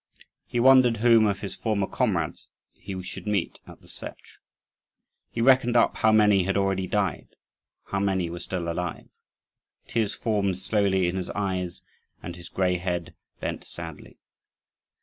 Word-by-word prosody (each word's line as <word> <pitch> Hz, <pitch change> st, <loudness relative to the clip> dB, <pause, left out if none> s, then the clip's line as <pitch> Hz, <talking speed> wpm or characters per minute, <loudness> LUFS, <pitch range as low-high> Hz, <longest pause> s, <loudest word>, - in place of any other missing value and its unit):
He 120 Hz, -, -2 dB
wondered 130 Hz, -2 st, +6 dB
whom 115 Hz, -1 st, +5 dB
of 100 Hz, -1 st, -1 dB
his 100 Hz, -3 st, -5 dB
former 105 Hz, -3 st, 0 dB
comrades -, -, -1 dB, 0.3 s
he 95 Hz, -1 st, -7 dB
should 95 Hz, -, -7 dB
meet 100 Hz, -4 st, -1 dB
at -, -, -13 dB
the -, -, -19 dB
Setch. -, -, -10 dB, 0.9 s
He 115 Hz, -, -3 dB
reckoned 125 Hz, -1 st, +4 dB
up -, -, +3 dB
how 110 Hz, -, +4 dB
many 105 Hz, -2 st, +5 dB
had 95 Hz, +2 st, 0 dB
already 95 Hz, -1 st, 0 dB
died, 100 Hz, -6 st, -1 dB, 0.6 s
how 100 Hz, -, -2 dB
many 95 Hz, -3 st, +1 dB
were 85 Hz, +1 st, -6 dB
still 90 Hz, -2 st, -4 dB
alive. 85 Hz, 0 st, -4 dB, 0.8 s
Tears 115 Hz, -4 st, -1 dB
formed 100 Hz, -5 st, 0 dB
slowly 95 Hz, -1 st, +1 dB
in 90 Hz, +2 st, -1 dB
his 90 Hz, -, -3 dB
eyes, 95 Hz, -3 st, -3 dB, 0.4 s
and 90 Hz, -, -6 dB
his 90 Hz, -1 st, -11 dB
grey 90 Hz, -1 st, +1 dB
head 90 Hz, -2 st, -3 dB, 0.3 s
bent -, -, -3 dB
sadly. 80 Hz, -3 st, -9 dB
95 Hz, 150 wpm, -26 LUFS, 90-110 Hz, 0.9 s, wondered